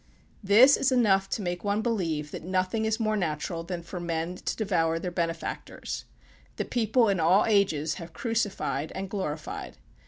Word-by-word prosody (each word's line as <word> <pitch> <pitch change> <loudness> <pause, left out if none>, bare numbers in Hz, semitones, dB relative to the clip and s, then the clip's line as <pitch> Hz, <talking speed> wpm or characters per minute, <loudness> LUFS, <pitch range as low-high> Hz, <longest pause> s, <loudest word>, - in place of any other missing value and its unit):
This 230 +8 +7
is 275 - +2
enough 195 -6 +3
to 210 - -2
make 175 -1 -3
one 205 +1 0
believe 165 -10 -1
that - - -6
nothing 185 +5 0
is 220 +1 0
more 215 -1 +1
natural 165 -2 -2
than 170 0 -5
for 180 +2 -6
men 170 0 -2
to - - -3
devour 165 -6 +1
their 180 +2 -4
benefactors. 165 -1 -4 0.5
The - - -2
people 235 0 +2
in 195 -3 +1
all 175 +5 +4
ages 195 -8 +2
have 165 0 -9
crucified 205 - -2
and 195 0 -5
glorified. 155 -7 -4
185 Hz, 165 wpm, -27 LUFS, 165-215 Hz, 0.5 s, This